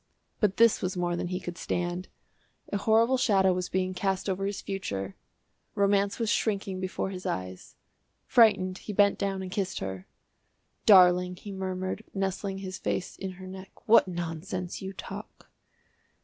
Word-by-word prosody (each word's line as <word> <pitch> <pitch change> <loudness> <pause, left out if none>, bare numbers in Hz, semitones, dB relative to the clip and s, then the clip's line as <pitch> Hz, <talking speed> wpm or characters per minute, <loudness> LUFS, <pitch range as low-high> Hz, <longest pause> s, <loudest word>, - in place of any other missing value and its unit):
But 200 -3 +2
this 230 -1 +5
was 185 +1 -2
more 175 -1 0
than 175 - -2
he 180 +1 -2
could 175 -1 -7
stand. 175 +1 -2 0.7
A - - +2
horrible 225 +5 +3
shadow 195 -6 +4
was 180 0 -2
being 185 0 0
cast 190 +1 -1
over 195 0 -1
his 200 - -3
future, 100 - -4 0.6
romance 200 0 +2
was 230 -2 0
shrinking 195 -4 0
before 185 +1 -3
his 185 -1 -6
eyes. 95 0 -5 0.5
Frightened, 190 -5 +4
he 210 - -6
bent 200 0 +4
down 195 -1 -1
and 185 - -6
kissed 190 -1 -2
her. 95 -1 -5 0.8
"Darling," 180 -2 +7
he 200 +3 -9
murmured, 185 +1 -3
nestling 195 0 -2
his 190 -1 -6
face 180 - -2
in 190 -1 -5
her 185 +1 -11
neck, 190 +1 -11
"what 225 -3 +7
nonsense 175 +1 -4
you 190 0 -5
talk." 195 - -9
190 Hz, 160 wpm, -28 LUFS, 180-200 Hz, 0.8 s, Darling